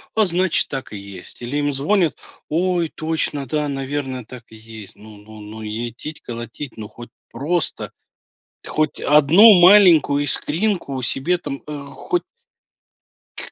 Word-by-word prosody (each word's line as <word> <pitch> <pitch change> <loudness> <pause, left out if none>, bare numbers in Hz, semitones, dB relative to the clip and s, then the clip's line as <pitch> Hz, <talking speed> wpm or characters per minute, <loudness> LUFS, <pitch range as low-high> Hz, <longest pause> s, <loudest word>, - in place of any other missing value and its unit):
а 220 -1 +4
значит 180 -1 +1
так 135 -1 -6
и 105 - -6
есть, 100 0 -12
или 120 +4 -5
им 145 0 0
звонят, 160 +6 +1 0.3
ой, 175 0 0
точно, 155 -3 -2
да, 150 +3 -2
наверное, 135 -2 -4
так 120 +1 -11
и 110 - -14
есть. 110 -2 -12
Ну, 110 0 -14
ну, 110 +1 -14
ну, 105 +1 -10
итить-колотить, 120 +3 -7
ну 105 -2 -8
хоть 120 0 -12 0.2
просто, 155 +6 -2 0.7
хоть 155 -1 -1
одну 170 +9 +7
маленькую 175 -7 +6
искринку 160 -2 -2
себе 135 +8 0
там, 140 -5 -7
э, 145 -2 -7
хоть 355 -1 -2 1.1
к - - -9
145 Hz, 140 wpm, -20 LUFS, 120-165 Hz, 1.1 s, одну